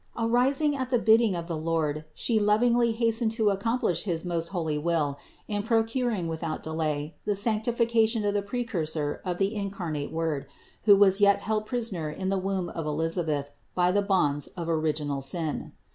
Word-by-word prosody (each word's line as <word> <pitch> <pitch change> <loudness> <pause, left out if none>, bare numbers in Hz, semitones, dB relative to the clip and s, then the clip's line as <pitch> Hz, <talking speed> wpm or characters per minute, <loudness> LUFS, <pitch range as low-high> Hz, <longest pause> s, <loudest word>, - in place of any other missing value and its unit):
Arising 260 +6 +2
at 260 -2 -3
the 250 - +3
bidding 225 -3 +4
of 170 -1 -4
the 170 -1 -3
Lord 155 -1 -1
She 225 -3 +1
lovingly 235 +3 +3
hastened 225 0 +1
to 220 -3 +2
accomplish 205 -3 0
his 170 -3 -2
most 170 -1 -1
holy 160 -5 -2
will, 150 -3 0 0.3
in 205 -1 -1
procuring 225 -3 0
without 160 -1 -4
delay 155 -1 -2
the 205 - +1
sanctification 225 +1 +1
of 205 - +1
the 205 - +1
Precur 200 -7 -3
sor 150 -2 -2
of 180 -2 -2
the 195 +3 +1
incarnate 190 -8 -4
Word, 160 -4 -2 0.4
who 205 -2 +8
was 195 0 +4
yet 200 0 +5
held 215 0 -1
prisoner 225 -11 -2
in 190 +5 -3
the 195 0 +1
womb 190 -2 -2
of 165 -2 -5
Elisabeth 155 -2 -1 0.2
by 180 0 +3
the 205 +2 +2
bonds 150 -8 +1
of 170 -1 -4
original 155 -3 -1
sin. 155 +3 -3
190 Hz, 175 wpm, -27 LUFS, 160-225 Hz, 0.4 s, who